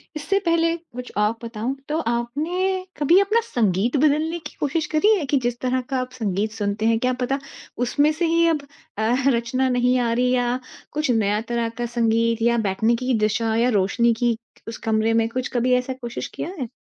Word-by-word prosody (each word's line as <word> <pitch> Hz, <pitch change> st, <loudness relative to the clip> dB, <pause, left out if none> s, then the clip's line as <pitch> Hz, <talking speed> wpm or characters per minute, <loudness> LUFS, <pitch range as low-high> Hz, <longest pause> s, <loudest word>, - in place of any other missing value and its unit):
इससे 390 Hz, +7 st, 0 dB
पहले 335 Hz, 0 st, +2 dB
कुछ 250 Hz, -7 st, -10 dB
और 210 Hz, +1 st, +3 dB
बताऊँ, 230 Hz, +3 st, -3 dB
तो 305 Hz, -, 0 dB
आपने 325 Hz, +11 st, -1 dB
कभी 315 Hz, +6 st, +5 dB
अपना 425 Hz, +4 st, +2 dB
संगीत 225 Hz, -, +1 dB
बदलने 310 Hz, +4 st, +2 dB
की -, -, -18 dB
कोशिश 305 Hz, +2 st, 0 dB
करी 415 Hz, +8 st, +4 dB
है 320 Hz, -, -2 dB
कि 280 Hz, +1 st, +1 dB
जिस 240 Hz, 0 st, -1 dB
तरह 255 Hz, 0 st, 0 dB
का 270 Hz, -, 0 dB
आप 255 Hz, 0 st, -6 dB
संगीत 215 Hz, -3 st, -1 dB
सुनते 210 Hz, 0 st, -2 dB
हैं, 225 Hz, 0 st, +3 dB
क्या 255 Hz, +2 st, +1 dB
पता 270 Hz, +3 st, 0 dB, 0.5 s
उसमें 290 Hz, +5 st, +2 dB
से 320 Hz, +3 st, -1 dB
ही 335 Hz, +1 st, +3 dB
अब 320 Hz, -3 st, +1 dB, 0.4 s
अ, 220 Hz, +2 st, +1 dB
रचना 255 Hz, +1 st, +1 dB
नहीं 250 Hz, 0 st, +2 dB
आ 235 Hz, -1 st, +1 dB
रही 250 Hz, +1 st, +2 dB
या 245 Hz, 0 st, +1 dB, 0.3 s
कुछ 300 Hz, -2 st, 0 dB
नया 210 Hz, -2 st, +1 dB
तरह 235 Hz, -1 st, 0 dB
का 240 Hz, -, 0 dB
संगीत 230 Hz, -1 st, +1 dB
या 235 Hz, +1 st, +3 dB
बैठने 220 Hz, +2 st, +1 dB
की 255 Hz, +2 st, -1 dB
दिशा 220 Hz, +1 st, +1 dB
या 235 Hz, +2 st, +3 dB
रोशनी 230 Hz, +2 st, +2 dB
की 235 Hz, 0 st, 0 dB, 0.3 s
उस 225 Hz, -, -5 dB
कमरे 220 Hz, 0 st, +1 dB
में 225 Hz, 0 st, +2 dB
कुछ 255 Hz, +2 st, -3 dB
कभी 250 Hz, +1 st, +2 dB
ऐसा 250 Hz, +1 st, -1 dB
कोशिश 240 Hz, -1 st, -5 dB
किया -, -, -4 dB
है? 255 Hz, -, -2 dB
245 Hz, 200 wpm, -23 LUFS, 225-290 Hz, 0.5 s, कभी